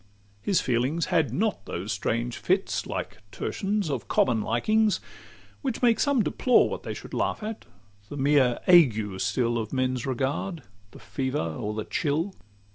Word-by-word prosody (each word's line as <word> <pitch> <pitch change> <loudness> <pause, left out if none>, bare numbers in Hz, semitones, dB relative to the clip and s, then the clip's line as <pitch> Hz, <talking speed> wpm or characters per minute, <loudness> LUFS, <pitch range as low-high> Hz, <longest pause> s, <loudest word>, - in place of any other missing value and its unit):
His 185 - +2
feelings 130 +7 0
had 160 -8 +3
not 210 - -1
those 95 +5 -4
strange 115 +3 -1
fits, 190 +2 0
like - - -5
tertians, 205 -1 -2
Of 125 -9 -3
common 115 0 +2
likings, 215 - +2 0.6
which 260 -3 -3
make 235 -2 +4
some 280 -6 +3
deplore 250 +4 +3
What - - -4
they - - -5
should - - -10
laugh - - -1
at 220 0 -5 0.4
the 145 - -6
mere 135 -3 +3
ague 110 - +5
still 115 +5 0
Of 110 -1 -4
men's 130 -1 -1
regard, 140 +6 -2 0.3
the - - -14
fever 130 +6 -3 0.2
or 105 +6 -4
the 110 - -3
chill. 160 +6 -1
135 Hz, 155 wpm, -26 LUFS, 115-190 Hz, 0.6 s, ague